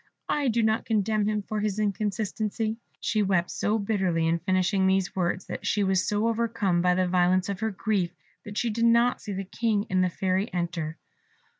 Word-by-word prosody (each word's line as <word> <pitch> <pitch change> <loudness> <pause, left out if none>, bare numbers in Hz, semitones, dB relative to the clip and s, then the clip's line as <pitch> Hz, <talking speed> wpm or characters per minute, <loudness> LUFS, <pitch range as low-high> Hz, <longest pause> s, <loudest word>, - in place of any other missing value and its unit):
I 290 -2 +1
do 230 -1 +2
not 220 0 +1
condemn 215 -1 +1
him 210 -1 -1
for 215 +1 -3
his 210 -1 -1
inconstancy." 215 +2 -1 0.2
She 220 -2 0
wept 185 -3 +1
so 215 +2 0
bitterly 190 -6 0
in 165 +1 +1
finishing 185 +1 +1
these 190 -1 +1
words, 180 0 -1
and - - -6
she 210 - +1
was 190 0 +1
so 210 +1 +1
overcome 225 -6 +1
by 180 0 +3
the 185 0 +1
violence 180 +1 +2
of 195 -2 -3
her 220 0 0
grief, 190 -3 -1 0.3
that 205 0 -8
she 235 - 0
did 230 +2 +1
not 235 +1 +3
see 205 - -5
the 195 +1 -3
King 210 +1 -1
and 185 0 +3
the 180 - +2
Fairy 190 +3 -1
enter. 170 -3 -3
200 Hz, 195 wpm, -27 LUFS, 185-220 Hz, 0.3 s, by